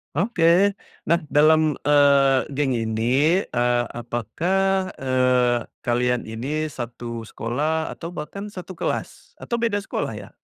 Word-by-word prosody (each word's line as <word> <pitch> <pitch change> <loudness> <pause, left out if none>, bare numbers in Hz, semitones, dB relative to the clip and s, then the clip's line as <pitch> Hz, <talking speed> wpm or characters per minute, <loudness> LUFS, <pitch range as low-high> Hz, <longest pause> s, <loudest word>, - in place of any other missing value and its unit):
Oke. 180 0 0 0.7
Nah, 170 - +4
dalam, 155 +1 +4
eee, 140 -2 +4
geng 140 -1 +1
ini, 110 -2 -1 0.5
eee, 120 0 +2 0.2
apakah, 185 - 0
eee, 125 -2 +1 0.2
kalian 125 0 +1
ini 145 +8 -3
1 120 -2 -6
sekolah 150 +10 -2
atau 170 +1 -8
bahkan 200 +7 -6
1 190 -2 -9
kelas? - - -4
Atau 235 -1 -2
beda 230 -3 0
sekolah - - -3
ya? - - -9
140 Hz, 120 wpm, -23 LUFS, 120-165 Hz, 0.7 s, Nah